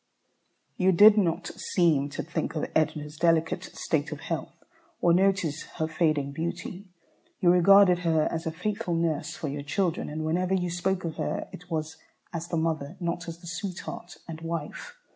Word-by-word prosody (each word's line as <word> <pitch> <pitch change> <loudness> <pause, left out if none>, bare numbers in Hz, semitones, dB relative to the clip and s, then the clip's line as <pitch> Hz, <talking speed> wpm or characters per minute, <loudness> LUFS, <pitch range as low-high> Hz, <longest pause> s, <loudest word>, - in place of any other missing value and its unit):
You 190 0 +4
did 210 +4 +8
not 175 -6 +1 0.3
seem 155 -6 +3
to - - -4
think 165 - -3
of 155 - -1
Edna's 150 -1 0
delicate 165 0 +2
state - - -1
of - - -6
health, - - -5 0.4
or 170 - +4
notice 185 -5 +2 0.2
her 160 -2 0
fading 155 -4 +1
beauty. 175 +5 -5 0.5
You 175 -2 +5
regarded 180 0 +6
her 160 -3 +2
as 165 0 -3
a - - 0
faithful 200 +2 -2
nurse 165 -3 -1
for 155 - -4
your 145 +1 -3
children, 170 +4 -1
and 155 +1 -4
whenever 180 +4 +1
you 180 -2 -1
spoke 185 +2 -1
of 160 - -4
her - - -2
it 180 +1 -11
was 160 -1 -3 0.4
as 165 0 -4
the 170 - -2
mother, 160 0 -1
not 175 0 -3
as 165 0 -7
the 175 - -11
sweetheart 175 0 -6
and 165 -1 -7
wife. 165 -2 -5
170 Hz, 175 wpm, -27 LUFS, 160-180 Hz, 0.5 s, did